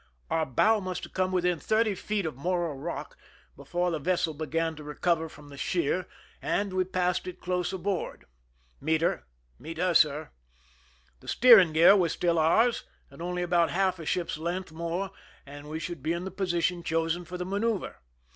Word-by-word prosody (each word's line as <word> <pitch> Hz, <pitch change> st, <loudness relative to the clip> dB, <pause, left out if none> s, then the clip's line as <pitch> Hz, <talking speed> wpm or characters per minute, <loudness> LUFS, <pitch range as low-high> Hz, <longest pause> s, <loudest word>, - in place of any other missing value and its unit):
Our 160 Hz, -1 st, +1 dB
bow 215 Hz, -, +3 dB
must 185 Hz, -2 st, -4 dB
have -, -, -9 dB
come 185 Hz, 0 st, 0 dB
within 180 Hz, -2 st, +1 dB
thirty 220 Hz, +2 st, +2 dB
feet 200 Hz, 0 st, -2 dB
of 155 Hz, -, -3 dB
Morro 175 Hz, +2 st, -1 dB
rock 145 Hz, +5 st, -6 dB, 0.4 s
before 175 Hz, 0 st, -2 dB
the 160 Hz, -, -2 dB
vessel 170 Hz, 0 st, 0 dB
began 160 Hz, +2 st, -2 dB
to 150 Hz, -, -9 dB
recover 160 Hz, +2 st, 0 dB
from 145 Hz, -1 st, -14 dB
the 140 Hz, -, -11 dB
sheer, 175 Hz, +4 st, 0 dB, 0.3 s
and 200 Hz, -2 st, -1 dB
we 185 Hz, 0 st, +1 dB
passed 180 Hz, -1 st, -1 dB
it 180 Hz, 0 st, -7 dB
close 180 Hz, -1 st, -1 dB
aboard. 190 Hz, 0 st, -3 dB, 0.6 s
^'Meet 160 Hz, +2 st, +1 dB
her!" 170 Hz, -, 0 dB, 0.3 s
"Meet 165 Hz, 0 st, -8 dB
her, 180 Hz, +1 st, +1 dB
sir." 155 Hz, -1 st, +3 dB, 0.9 s
The -, -, -17 dB
steering 220 Hz, -10 st, +7 dB
gear 170 Hz, +5 st, +7 dB
was 180 Hz, -4 st, +2 dB
still 170 Hz, -2 st, +1 dB
ours, 225 Hz, +10 st, +3 dB, 0.3 s
and 140 Hz, -, -12 dB
only 180 Hz, +1 st, -2 dB
about 175 Hz, -1 st, +2 dB
half 185 Hz, -1 st, +1 dB
a 160 Hz, -, -7 dB
ship's 170 Hz, -3 st, -1 dB
length 175 Hz, +2 st, -3 dB
more 170 Hz, +4 st, -3 dB, 0.3 s
and 145 Hz, +1 st, -10 dB
we 155 Hz, -, -3 dB
should 170 Hz, -3 st, -5 dB
be 160 Hz, +5 st, 0 dB
in 170 Hz, +2 st, -4 dB
the 190 Hz, -, -5 dB
position 180 Hz, -2 st, 0 dB
chosen 165 Hz, +1 st, -1 dB
for 180 Hz, +2 st, -7 dB
the 180 Hz, -, -4 dB
manoeuver. 200 Hz, +1 st, -1 dB
175 Hz, 185 wpm, -28 LUFS, 160-185 Hz, 0.9 s, steering